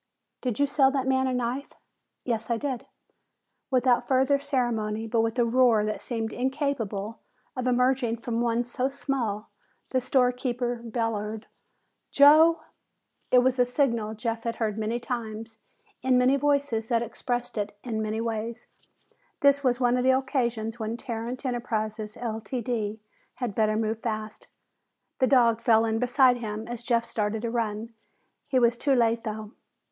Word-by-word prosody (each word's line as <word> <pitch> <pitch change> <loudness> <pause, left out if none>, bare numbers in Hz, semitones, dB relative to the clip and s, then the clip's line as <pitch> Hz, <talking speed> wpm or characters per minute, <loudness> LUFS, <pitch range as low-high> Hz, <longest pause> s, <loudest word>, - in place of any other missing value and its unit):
"Did 245 -4 -2
you 285 - +5
sell 275 -1 +4
that 270 -1 -1
man 265 0 +2
a 260 - 0
knife?" 250 +3 -3 0.5
"Yes, 225 -2 -2
I 235 - +1
did." 260 -1 -4 0.8
Without 255 -2 +2
further 265 +1 +3
ceremony, 225 -6 -1
but 225 0 +1
with 225 +2 -1
a 240 - +3
roar 235 -3 +4
that 215 - -3
seemed 225 -2 -3
incapable 245 -6 -2 0.4
of 255 0 -2
emerging 250 -1 +2
from 235 0 -2
one 235 0 +1
so 250 +2 -2
small, 245 -6 -3 0.4
the 255 - +1
storekeeper 250 -1 0
bellowed, 225 -2 -3 0.6
"Joe!" 310 +4 +6 0.7
It 250 -1 +5
was 260 0 +1
a - - +7
signal 235 -5 0
Jeff 225 0 -3
had 230 -1 -2
heard 220 -3 -1
many 220 +2 -2
times 225 -2 -5 0.4
in 260 0 +3
many 250 +2 +4
voices 280 -5 0
that 235 -1 +1
expressed 245 +1 -4
it 205 -1 -3
many 220 -2 -2
ways. 230 0 -4 0.8
This 280 0 +4
was 250 -2 +2
one 245 -1 +3
of 250 - 0
the 260 0 +5
occasions 240 -4 -2
when 220 +1 -3
Tarrant 240 +3 -5
Enterprises, 220 -3 -3
Ltd., 225 -1 -3 0.4
had 245 -5 -3
better 215 0 +1
move 220 0 -1
fast. 215 -2 -5 0.7
The 260 - +4
dog 235 -4 +4
fell 225 -2 +4
in 225 0 0
beside 250 +1 +4
him 220 -1 -5
as 240 -1 -6
Jeff 235 -1 +1
started 215 0 -2
to 230 - -2
run. 225 -1 -2 0.5
He 260 - +1
was 240 -1 +4
too 275 +2 +2
late, 230 -1 +2
though. 215 -1 -5
235 Hz, 155 wpm, -27 LUFS, 220-255 Hz, 0.8 s, a